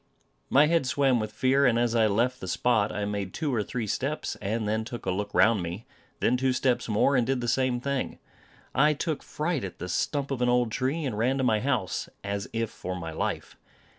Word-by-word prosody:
My 145 +3 +6
head 165 -4 +2
swam 135 -2 +2
with 110 -1 -3
fear; 130 +4 +3
and 115 -2 +3
as 120 -1 +1
I 115 -2 +4
left 120 +5 0
the 95 - -5
spot, 110 +3 +1
I 105 - -2
made 100 -2 -3
two 150 -4 -1
or 115 - +1
three 115 +2 -3
steps, 135 +8 -2
and 105 +2 -1
then 110 +1 0
took 120 +1 -7
a - - +1
look 105 +2 -3
round 115 -4 +4
me; 90 +6 -5 0.4
then 125 - +3
two 130 0 +1
steps 125 -2 0
more, 110 +6 +3
and 125 - +4
did 135 -1 +1
the 120 - -3
same 125 0 +1
thing. 140 +1 -2 0.6
I 150 +2 +4
took 155 +1 -2
fright 155 -3 -2
at 95 - -6
the 90 - -5
stump 140 - -1
of 130 -2 -2
an 125 - +3
old 125 -2 +2
tree, 135 +7 -1
and 125 -6 -2
ran 130 +4 +2
to 135 - 0
my 110 -4 +3
house, 110 -9 -1
as 100 0 -3
if 115 -1 -2
for 90 0 -5
my 85 -3 -5
life. 80 - -3
120 Hz, 225 wpm, -27 LUFS, 105-135 Hz, 0.6 s, My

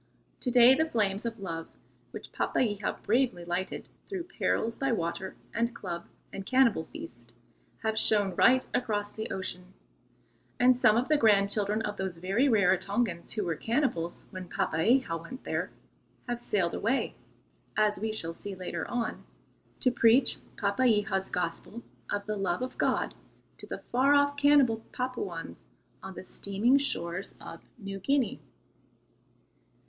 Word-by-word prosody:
To 250 - -1
day 245 +1 +8
the 315 +4 +1
flames 210 -3 0
of 225 -1 -5
love 165 -4 -5 0.4
which - - -9
Papeiha 205 -4 -1
bravely 225 -5 +1
lighted, 175 +2 -3 0.2
through 380 -4 -3
perils 230 -8 -1
by 270 -1 0
water 185 -2 -2 0.2
and 235 +1 0
club 170 -3 -5 0.3
and 195 - -5
cannibal 235 -7 +3
feast, 325 +2 -11 0.5
have 220 0 +1
shone 205 -4 +3
right 255 +1 +4
across 205 -4 -1
the 220 - -5
ocean, 185 0 -5 0.8
and 250 +1 +6
some 225 -3 +4
of 245 - +1
the 305 - +4
grandchildren 210 -1 +3
of 210 -1 -3
those 190 -3 -3
very 195 +10 +1
Rarotongans 200 -3 +1
who 210 - -1
were 170 -3 -1
cannibals 225 - -1
when 185 -1 -7
Papeiha 165 +6 +1
went 255 +10 -9
there, - - -2 0.6
have 240 -1 -3
sailed 190 -7 0
away, 260 +5 0 0.6
as 210 -2 +2
we 220 +1 -1
shall 165 -6 -3
see 200 +3 -7
later 185 -1 -4
on, 240 -2 -3 0.6
to 255 - +4
preach 240 +2 +5 0.2
Papeiha's 205 -2 +1
gospel 180 +6 -4 0.3
of 205 0 -2
the 215 0 -2
love 195 +2 -1
of 255 - -5
God - - +1 0.4
to - - -9
the - - -6
far 270 +4 +4
off 285 0 +3
cannibal 285 -5 +5 0.2
Papuans 190 - -5 0.3
on 190 0 -8
the - - -7
steaming 205 +8 +1
shores 175 -9 -3
of - - -10 0.2
New 195 -3 -6
Guinea. 275 +5 0
215 Hz, 145 wpm, -29 LUFS, 190-250 Hz, 0.8 s, day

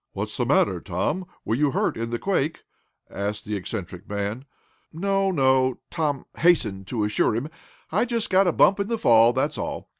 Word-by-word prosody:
"What's - - -4
the - - -1
matter, - - +2
Tom; 150 - -2 0.2
were - - -1
you 145 +4 +2
hurt - - 0
in 115 0 -3
the 120 - -2
quake?" 160 -2 -1 0.5
asked 100 +1 -4
the 105 - -3
eccentric 95 -1 -6
man. 105 +5 -3 0.5
"No 195 +3 0
no," 130 -5 +2
Tom 150 -5 -1
hastened 110 - +2
to 115 -4 -2
assure 105 +1 +1
him. 125 +7 -3 0.4
"I 205 +8 +2
just 230 -3 -2
got 190 0 +4
a - - +4
bump 195 +4 +4
in 200 - -1
the 230 0 -1
fall 115 - +5
that's 135 +4 -1
all. - - -5
130 Hz, 185 wpm, -24 LUFS, 105-180 Hz, 0.5 s, fall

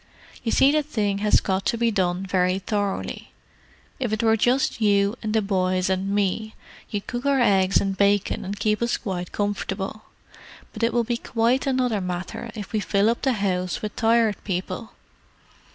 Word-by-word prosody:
You 230 - -2
see 275 - +5
the 305 +1 +3
thing 210 -9 -1
has 210 0 +4
got 190 0 -1
to 235 - +1
be 235 0 +2
done 185 -2 0
very 185 0 +1
thoroughly. 200 0 -3 0.7
If 245 -4 -1
it 215 +1 -1
were 225 0 +4
just 245 +2 +1
you 200 0 +3
and 215 - -2
the 220 -1 +2
boys 185 -1 +1
and 190 +1 -1
me 205 +2 -1 0.3
you'd 205 -1 -4
cook 245 0 -4
our 275 -1 +3
eggs 195 -5 +4
and 195 -1 -1
bacon 200 0 +1
and 200 +2 -5
keep 210 +1 +1
us 235 -1 +1
quite 180 -3 -4
comfortable. 205 0 -3 0.7
But 215 - -7
it 230 +1 +2
will 240 - +2
be 235 +1 -1
quite 240 +3 0
another 250 -6 +1
matter 180 +5 -5
when 210 -2 -5
we 215 - +2
fill 205 +1 +2
up 240 +3 -3
all - - +5
those 205 - -4
rooms 180 -2 -1
with 210 -1 -4
Tired 225 -2 +2
People." 185 +3 -4
205 Hz, 185 wpm, -24 LUFS, 195-230 Hz, 0.7 s, see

